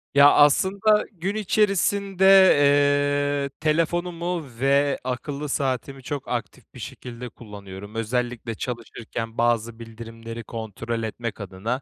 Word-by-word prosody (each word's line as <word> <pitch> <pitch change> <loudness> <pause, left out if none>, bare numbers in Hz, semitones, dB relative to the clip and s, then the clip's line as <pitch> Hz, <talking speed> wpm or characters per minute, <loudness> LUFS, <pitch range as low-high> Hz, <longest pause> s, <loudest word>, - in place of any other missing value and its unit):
Ya, 140 +1 +8
aslında 195 +8 +4
gün 195 +2 -4
içerisinde, 200 -2 +1 1.2
eee, - - -5
telefonumu 170 +2 -1 0.2
ve 140 +1 +2
akıllı 140 +3 -4
saatimi 135 0 -2
çok 145 -1 -5
aktif 120 -4 -5
bir - - -12
şekilde 125 0 -8
kullanıyorum. 100 -1 -11
Özellikle 120 0 -2
çalışırken 115 -1 -6
bazı 115 -1 0
bildirimleri 115 0 -9
kontrol 115 +1 -5
etmek 115 0 -5
adın, 95 +2 -9
125 Hz, 105 wpm, -24 LUFS, 115-160 Hz, 1.2 s, Ya